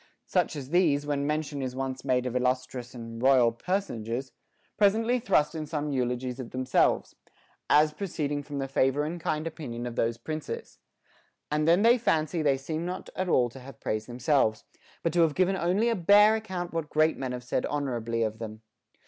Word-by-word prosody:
Such 180 -3 0
as 140 -1 -7
these, 155 -5 +3
when 145 -1 -1
mention 150 -2 -2
is 130 -1 -4
once 130 0 -4
made 125 -2 +1
of 125 -1 -3
illustrious 125 -1 -1
and 115 -1 -8
royal 130 -3 +5
personages, 130 - -3 0.4
presently 225 +4 +3
thrust 150 -11 +2
in 155 -2 -4
some 150 -1 -2
eulogies 125 -1 -2
of 125 -3 -6
themselves, 130 0 +1 0.5
as 150 +1 +5
pro 200 +6 -4
ceeding 145 -4 -2
from 145 0 -6
the 135 -1 -2
favor 135 +1 +1
and 165 +3 -4
kind 155 0 -1
opinion 135 -8 -5
of 120 -1 -5
those 115 0 0
princes; 155 +6 -6 0.7
and 150 +1 +1
then 175 +5 +5
they 240 +2 +6
fancy 160 -5 +1
they 140 -3 +3
seem 155 +4 -4
not 180 +2 -5
at 185 -1 -2
all 125 -6 +4
to 130 - -12
have 130 -1 -12
praised 110 0 -3
themselves, 125 -2 +1 0.4
but 165 - 0
to 175 - +4
have 160 -3 +3
given 185 +1 +2
only 190 +5 +1
a 235 - +2
bare 205 +3 +6
account 185 -6 -4
what 165 -2 -3
great 155 +1 +3
men 130 -2 -4
have 125 0 -5
said 125 - -1
honorably 120 -5 -1
of 110 0 -3
them. 110 -1 -7
145 Hz, 190 wpm, -28 LUFS, 125-165 Hz, 0.7 s, they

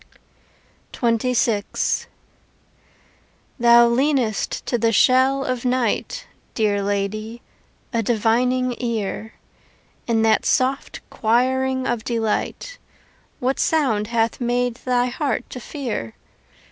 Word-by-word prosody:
XXVI 230 -2 0 1.5
Thou 235 0 +7
leanest 250 -3 0
to 240 - -1
the 230 0 +2
shell 260 +4 +3
of 255 -2 -2
night, 255 - -1 0.3
Dear 205 -3 +1
lady, 205 +3 -3 0.5
a 230 - +1
divining 245 +3 +1
ear. 220 -2 -3 0.7
In 225 -2 +2
that 220 -1 +3
soft 265 +2 0
choiring 260 +3 +1
of 235 -3 -1
delight 235 - -2 0.6
What 260 +2 -1
sound 255 -10 +1
hath 230 +1 0
made 245 0 0
thy 245 -1 +2
heart 265 0 -2
to 250 - -6
fear? 240 - -5
240 Hz, 95 wpm, -21 LUFS, 225-255 Hz, 1.5 s, Thou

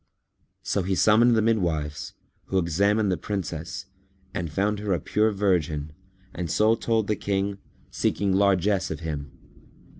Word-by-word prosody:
So 100 - 0
he 95 +1 -1
summoned 115 +5 +5
the 110 - +3
midwives, 80 -10 -1 0.3
who 95 - -1
examined 100 +4 +2
the 90 - 0
Princess 85 -1 -4 0.5
and 90 -5 -3
found 100 +5 0
her 105 -2 -1
a 85 - 0
pure 110 +8 +1
virgin 85 -7 0 0.4
and 85 -1 -4
so 110 +6 +3
told 115 -1 0
the 105 - 0
King, 100 0 -2 0.3
seeking 100 -2 0
largesse 95 0 +2
of 80 +1 -5
him. 75 -3 -5
95 Hz, 145 wpm, -25 LUFS, 85-105 Hz, 0.5 s, summoned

